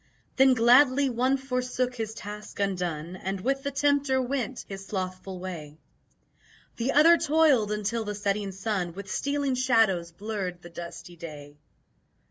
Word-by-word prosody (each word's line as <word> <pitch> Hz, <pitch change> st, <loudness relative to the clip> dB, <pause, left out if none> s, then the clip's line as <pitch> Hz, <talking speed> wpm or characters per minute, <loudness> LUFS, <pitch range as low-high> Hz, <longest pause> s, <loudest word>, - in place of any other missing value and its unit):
Then 265 Hz, -1 st, +6 dB
gladly 255 Hz, +3 st, +5 dB
one 255 Hz, +3 st, +2 dB
forsook 255 Hz, -1 st, -2 dB
his 225 Hz, -2 st, -5 dB
task 210 Hz, 0 st, -8 dB
undone 180 Hz, -4 st, -2 dB
And 190 Hz, +1 st, -4 dB
with 270 Hz, +7 st, 0 dB
the 280 Hz, -, -2 dB
Tempter 280 Hz, -1 st, +2 dB
went 260 Hz, -1 st, -3 dB
his 195 Hz, -1 st, -8 dB
slothful 185 Hz, -1 st, -4 dB
way, 160 Hz, -5 st, -7 dB, 1.0 s
The 245 Hz, +3 st, 0 dB
other 330 Hz, +3 st, +7 dB
toiled 295 Hz, -9 st, +3 dB
until 210 Hz, +2 st, -1 dB
the 210 Hz, -1 st, -4 dB
setting 200 Hz, -1 st, -1 dB
sun 190 Hz, -3 st, -2 dB
With 195 Hz, +1 st, -8 dB
stealing 280 Hz, -1 st, 0 dB
shadows 225 Hz, -9 st, +2 dB
blurred 190 Hz, -2 st, -5 dB
the 175 Hz, -, -11 dB
dusty 170 Hz, +1 st, -9 dB
day. 145 Hz, -3 st, -9 dB
215 Hz, 140 wpm, -27 LUFS, 185-260 Hz, 1.0 s, other